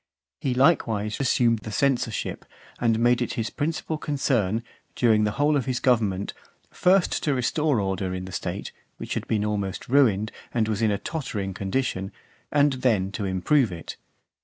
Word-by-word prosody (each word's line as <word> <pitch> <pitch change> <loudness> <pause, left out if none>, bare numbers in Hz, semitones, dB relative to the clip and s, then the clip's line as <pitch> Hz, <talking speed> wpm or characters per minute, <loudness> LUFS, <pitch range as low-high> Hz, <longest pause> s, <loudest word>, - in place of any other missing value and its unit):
He 130 -2 -1
likewise 115 -7 +2
assumed 120 -3 +2
the 110 - -8
censorship, 125 -2 0 0.4
and 115 -2 +2
made 120 +1 +3
it 120 - -1
his 115 -1 -3
principal 155 +1 -2
concern, 115 -8 0 0.3
during 110 -3 +3
the 105 - -1
whole 145 +1 +3
of 135 - 0
his 125 -2 0
government, 105 -6 +1 0.4
first 185 0 +2
to 145 -3 +1
restore 140 +1 +1
order 95 -1 -1
in 90 0 -4
the 95 - -8
state, - - -4 0.3
which - - -5
had - - -3
been 105 -1 0
almost 100 -2 -3
ruined, 110 -6 +3 0.2
and 115 -2 +1
was 110 0 -1
in 110 - +3
a 100 - +1
tottering 105 - -4
condition, 95 -1 -2 0.4
and 145 -1 +4
then 100 -7 +2
to 105 - -3
improve 100 +6 +2
it. 85 -1 -7
115 Hz, 165 wpm, -25 LUFS, 100-135 Hz, 0.4 s, and